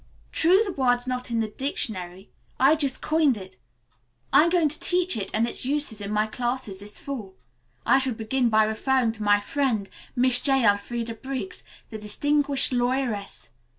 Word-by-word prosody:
True 355 +4 +4
the 395 - -3
word's 245 -3 +1
not 250 -1 -4
in 230 -1 0
the 220 - -1
dictionary. 195 -7 -3 0.3
I 270 +4 +5
just 280 -4 -1
coined 305 -6 +2
it. 190 -8 -11 0.8
I'm 325 +3 +6
going 340 -3 +3
to 305 - -6
teach 360 -4 +1
it 200 -3 -3
and 225 +2 +1
its - - -2
uses 270 -5 -2
in 200 - -5
my 210 0 +1
classes 240 -3 -3
this 205 +1 -7
fall. 220 -9 -7 0.5
I 270 - +5
shall 260 -3 0
begin 235 +3 0
by 220 -1 +4
referring 230 +3 +1
to 220 -1 -10
my 205 0 +4
friend, 230 -3 -1 0.3
Miss 250 0 +4
J. 270 -3 +3
Elfreda 230 +3 0
Briggs, 270 +10 -6 0.3
the 220 - -6
distinguished 280 +7 +1
lawyeress. 245 - -2
245 Hz, 170 wpm, -25 LUFS, 215-275 Hz, 0.8 s, I'm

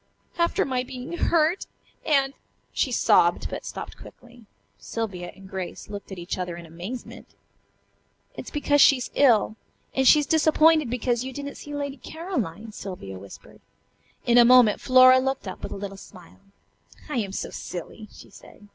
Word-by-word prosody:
"After 340 0 +2
my 255 -2 -1
being 255 +5 -8
hurt, 335 +1 +1 0.4
and 275 -3 +2 0.2
" - - -43
she - - 0
sobbed, - - +3
but - - -5
stopped - - -7
quickly. 240 -2 -15 0.3
Sylvia 190 -6 -5
and 195 0 -14
Grace 190 +1 -7
looked 200 -1 -8
at 190 - -6
each 175 +2 -5
other 180 -2 -4
in 170 - -10
amazement. 180 +10 -9 1.0
"It's - - -8
because 290 -1 +2
she 275 - +7
is 250 - -6
ill. 225 -5 +3 0.4
And 265 0 +2
she's 295 +1 +6
disappointed 315 -2 +4
because 245 0 -1
you 260 - -5
didn't 285 +1 -6
see 295 0 -9
Lady 285 -1 -4
Caroline," 240 - -5
Sylvia 180 - -8
whispered. 100 +1 -14 0.6
In 240 0 +5
a - - +9
moment 240 -3 +6
Flora 255 0 +7
looked 265 -4 -2
up 185 - -7
with - - -6
a - - -5
little 195 0 -7
smile. 185 -1 -15 0.7
"I 300 - -3
am 205 -4 -2
so - - -5
silly," 200 +5 -8
she - - -15
said. 205 - -16
245 Hz, 165 wpm, -25 LUFS, 195-280 Hz, 1.0 s, a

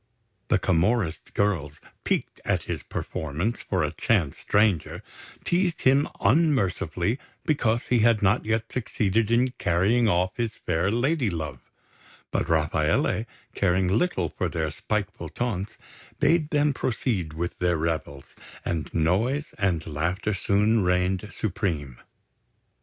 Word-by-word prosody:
The - - +3
Camorrist 90 0 0
girls, 80 -8 0 0.2
piqued - - -2
at - - 0
his - - -4
preference 80 - -3
for 95 -4 -1
a 75 - -1
chance 85 -3 0
stranger, 105 -6 +1 0.4
teased 175 -1 +1
him 135 +3 +4
unmercifully 110 - +2 0.3
because 120 -7 +1
he 125 - +4
had 115 -1 +4
not 100 +4 +3
yet 110 +1 -1
succeeded 110 -3 0
in 125 +2 +3
carrying 105 +7 +3
off 90 0 +2
his 115 -2 -2
fair 85 +2 0
lady 125 +3 +1
love; 75 -7 -4 0.7
but 80 - -1
Rafaele, 80 +6 +1 0.3
caring 95 -1 +2
little 95 - +1
for - - -2
their 80 -2 -2
spiteful 100 -1 -3
taunts, 105 -1 -3 0.4
bade 165 -3 +3
them 145 -1 +2
proceed 110 - -1
with 85 +2 -4
their 90 -1 +2
revels, 75 -3 -3 0.3
and 80 -2 -2
noise 110 - +1
and 90 -5 +1
laughter 85 +7 -1
soon 105 +3 +2
reigned 90 +2 0
supreme. 85 - -3
100 Hz, 125 wpm, -26 LUFS, 85-115 Hz, 0.7 s, him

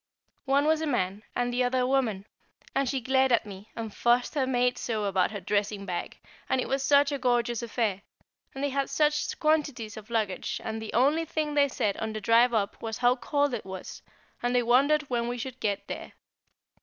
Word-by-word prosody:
One 280 +1 +3
was 315 0 +3
a 320 - -1
man, 200 -6 -1
and 245 0 0
the 250 +1 +2
other 250 +1 +1
a 250 - +1
woman, 235 -8 0 0.5
and 275 -2 +1
she 270 - 0
glared 265 +1 +2
at 235 - +3
me, 200 +1 -10
and 225 -2 -5
fussed 240 +1 +2
her 275 -4 0
maid 250 -1 +1
so 220 -3 -2
about 190 -2 +2
her 205 - -5
dressing 200 +1 -1
bag, 180 -2 -4 0.3
and 260 - +2
it - - -1
was 270 0 0
such 285 +1 +4
a 280 - -2
gorgeous 240 -2 +1
affair, 220 -4 -1 0.5
and 270 - -4
they 285 - +1
had 275 0 -1
such 300 +1 +1
quantities 290 -9 0
of 215 0 -10
luggage, 225 +1 -1
and 220 0 -4
the 220 - -6
only 285 +7 +3
thing 310 -2 -2
they 285 -1 +4
said 210 -6 -1
on 220 0 -3
the 215 - -3
drive 230 +3 +4
up 210 -4 -1
was 225 -1 -4
how 245 0 +4
cold 285 +1 0
it 235 - -3
was, 190 -1 -8 0.4
and 245 +1 0
they 245 - +3
wondered 280 +6 +4
when 240 -4 -2
we 245 +1 -3
should 255 +1 -6
get 200 -2 -2
there. - - -7
245 Hz, 215 wpm, -28 LUFS, 220-275 Hz, 0.5 s, such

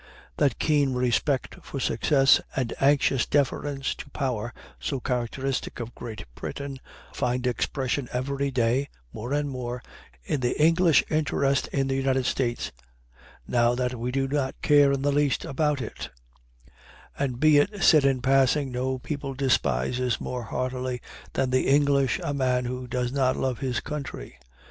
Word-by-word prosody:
That 145 -2 +2
keen 145 -4 +2
respect 125 +2 0
for 140 - -6
success 135 0 +4
and 125 -3 -1
anxious 135 -2 +3
deference 140 -1 0
to 140 - -10
power 125 -5 -2 0.3
so 135 - -2
characteristic 125 +2 -2
of 120 0 -6
Great 115 -8 -8
Britain 140 - -6 0.3
find 125 +1 -1
expression 130 +1 -1
every 140 +2 -1
day, 125 +2 +1 0.2
more 120 +4 -6
and 145 0 +1
more, 125 -2 -5 0.4
in 135 - -1
the 125 -1 -1
English 165 +1 +5
interest 140 -3 +1
in 135 -1 0
the 135 - 0
United 135 -1 +1
States, 120 -2 -1 0.8
now 120 0 +3
that 125 0 -1
we 120 0 -3
do 135 +1 0
not 135 -1 -2
care 145 -1 +5
in 135 -1 -1
the 145 - +2
least 145 -1 +1
about 145 0 0
it; - - -7 1.1
and 130 -4 -2
be 155 0 +6
it 205 +6 0
said 155 -4 +6
in 135 -3 +2
passing, 135 +1 +3
no 130 +1 -1
people 140 0 -5
despises 125 -2 +1
more 125 -2 -4
heartily 125 +2 -3 0.3
than 130 -1 0
the 130 - +2
English 140 -2 +3
a 145 - -1
man 130 -2 +1
who 125 +1 -4
does 125 0 -1
not 130 -2 +1
love 130 -3 -1
his 130 -4 -1
country. 140 - -6
135 Hz, 155 wpm, -26 LUFS, 125-140 Hz, 1.1 s, be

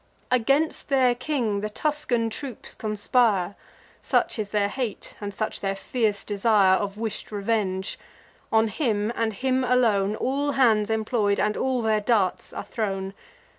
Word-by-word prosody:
Against 275 +8 +2
their 260 -3 +4
king 240 -6 -1
the 215 - -2
Tuscan 250 -3 0
troops 255 0 -7
conspire; 210 -3 +1 0.5
Such - - 0
is 210 -2 -2
their 205 -1 +1
hate, 230 -1 -5
and 205 0 -4
such 215 +2 -3
their 195 0 -1
fierce 210 0 -1
desire 205 -2 +3
Of 200 0 -4
wish'd 220 -1 -5
revenge: 200 -3 -1 0.5
on 220 0 +3
him, 215 -4 0
and 230 -1 0
him 260 +5 0
alone, 220 -5 +2
All 280 +5 -1
hands 220 -6 +3
employ'd, 220 -2 +1
and 210 0 +1
all 255 -2 0
their 215 -1 +2
darts 205 -4 +1
are - - -6
thrown. 195 -3 -3
220 Hz, 145 wpm, -25 LUFS, 205-250 Hz, 0.5 s, their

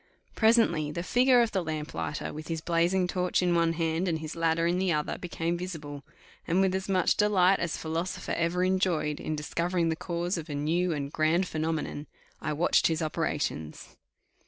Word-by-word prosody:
Presently 220 -10 +3
the 170 +3 -4
figure 250 +4 +4
of 230 - -2
the 190 -2 -1
lamp 155 -2 -4
lighter 80 -2 -4
with 155 0 -8
his 165 -1 -2
blazing 175 +3 +1
torch 180 0 0
in 175 -1 +2
one 170 -1 +2
hand, 165 +2 -1
and 165 -2 0
his 155 0 -6
ladder 165 0 +1
in 175 +2 +1
the 190 -1 +1
other, 150 -2 -1
became 170 -1 -2
visible; 150 -6 -6 0.4
and, 175 +3 +2
with 190 -1 +3
as 190 +1 -3
much 185 -2 +3
delight 195 -2 +4
as 170 -2 -2
philosopher 165 +3 -3
ever 170 +2 0
enjoyed 180 -5 +1
in 155 - -3
discovering 170 +3 -1
the 160 - 0
cause 175 +2 -2
of 160 0 -9
a 145 - -3
new 170 +5 0
and 145 -2 -3
grand 165 +4 +2
phenomenon, 155 -2 -3 0.3
I - - -2
watched 155 +4 +3
his 160 0 -1
operations. 150 - -3
170 Hz, 185 wpm, -28 LUFS, 155-180 Hz, 0.4 s, figure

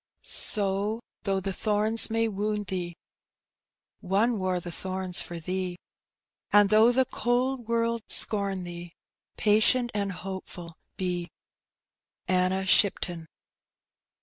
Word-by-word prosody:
Sow, 205 +1 +1 0.3
though 195 -1 +1
the 190 0 -4
thorns 215 +3 +1
may 225 0 +1
wound 210 0 -2
thee, 175 -3 -4 1.0
One 205 +5 +1
wore 185 -1 -1
the 175 0 -8
thorns 185 0 -2
for 170 -1 -6
thee; 180 +1 -3 0.7
And 205 -1 +5
though 220 +3 +6
the 260 +1 +2
cold 245 0 -1
world 230 0 0
scorn 200 -3 +3
thee. 175 -1 -8 0.4
Patient 220 +3 +3
and 200 -1 -2
hopeful 180 -2 -8 0.2
be. 180 -2 -3 1.0
Anna 185 +1 +1
Shipton. 175 -4 +2
195 Hz, 110 wpm, -27 LUFS, 185-220 Hz, 1.0 s, though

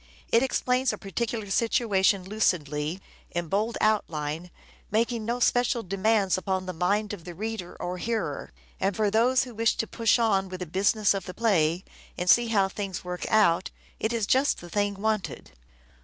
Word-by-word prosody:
It 230 - +5
explains 255 0 +1
a 210 - -5
particular 210 +1 -4
situation 200 -4 +2
lucidly, 170 -5 -1 0.3
in 175 -2 -3
bold 215 +5 0
outline, 165 -6 0 0.4
making 230 +1 0
no 240 +2 -1
special 245 0 +2
demands 195 0 +1
upon 185 0 -2
the 185 - -4
mind 200 +5 0
of 185 -5 -8
the 175 0 -8
reader 215 -2 -5
or 180 +1 -4
hearer; 230 +2 -3 0.3
and, 195 0 0
for 210 -2 +1
those 245 +4 +3
who 250 -2 -9
wish 225 +1 +1
to - - -1
push 230 0 +2
on 200 -5 +1
with 185 0 -6
the - - -2
business 200 +5 +2
of 195 -2 -4
the 180 - -8
play 180 -6 +2 0.3
and 180 0 +3
see 240 0 +5
how 200 -4 +3
things 195 -1 -5
work 180 0 -5
out, 185 -5 +3 0.3
it 220 - 0
is 230 -3 0
just 265 +6 +2
the 175 -1 -11
thing 205 +1 0
wanted. 215 - -2
205 Hz, 175 wpm, -27 LUFS, 180-225 Hz, 0.4 s, It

